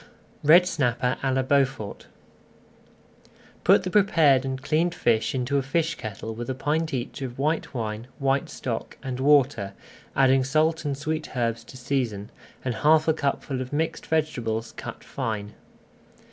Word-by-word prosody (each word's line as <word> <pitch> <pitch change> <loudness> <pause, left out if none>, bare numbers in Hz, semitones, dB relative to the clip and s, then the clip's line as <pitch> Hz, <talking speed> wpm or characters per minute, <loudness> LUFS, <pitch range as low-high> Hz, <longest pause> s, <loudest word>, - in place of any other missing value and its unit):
RED 170 +5 +7
SNAPPER 125 -6 0
À 135 - 0
LA 130 0 +1
BEAUFORT 130 -6 0 1.6
Put - - +5
the 185 - -3
prepared 165 -10 +4
and 130 0 -3
cleaned 160 +5 0
fish 115 -4 +1
into 130 +2 0
a - - 0
fish 160 +5 0
kettle 110 -1 -6
with 120 +2 -6
a 130 - -1
pint 155 +4 -1
each 130 +1 -4
of 125 -2 -5
white 150 +1 -1
wine, 110 0 -4
white 135 0 0
stock, 115 -3 -5
and 130 -1 -4
water, 135 -8 +3 0.4
adding 135 -1 +4
salt 155 +4 +1
and 140 -2 -1
sweet 155 -1 -4
herbs 115 -1 0
to 120 - -12
season, 120 -5 -2 0.3
and 125 - 0
half 155 +1 +5
a 160 - +5
cupful 140 -3 -2
of 130 - -6
mixed 160 +2 -2
vegetables 120 -8 -1
cut - - -8
fine. 105 -2 -4
135 Hz, 155 wpm, -25 LUFS, 120-155 Hz, 1.6 s, RED